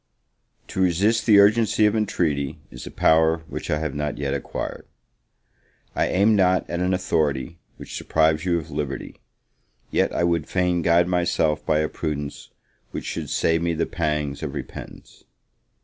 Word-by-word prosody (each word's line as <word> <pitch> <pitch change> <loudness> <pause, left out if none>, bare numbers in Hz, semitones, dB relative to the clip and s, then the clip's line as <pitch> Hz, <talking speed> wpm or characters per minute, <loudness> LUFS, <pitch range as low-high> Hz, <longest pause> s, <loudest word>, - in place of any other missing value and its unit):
TO 95 - -3
resist 100 +6 +2
the 105 -3 +7
urgency 105 +1 +4
of 105 - +3
intreaty, 80 -11 -1
is - - -9
a - - -5
power 80 0 +3
which - - -6
I 75 - +1
have 80 -2 -3
not 75 0 -3
yet 70 -1 -2
acquired: 70 - -5 1.1
I - - +1
aim 105 +4 +3
not 95 -2 +2
at 85 - -3
an 90 +1 +1
authority 80 -4 -1 0.2
which - - -7
deprives 80 0 +2
you 90 -2 +1
of 80 - -6
liberty, 70 -2 -5 0.7
yet - - +2
I - - -1
would 85 -3 +1
fain 90 -2 +1
guide 85 +1 +3
myself 85 -3 +1
by 75 0 +2
a 75 - 0
prudence 75 -3 -5 0.4
which - - -6
should - - -4
save 80 0 +1
me 85 -1 0
the 85 - 0
pangs 75 -4 -2
of 75 -4 -5
repentance. - - -9
85 Hz, 165 wpm, -23 LUFS, 75-90 Hz, 1.1 s, the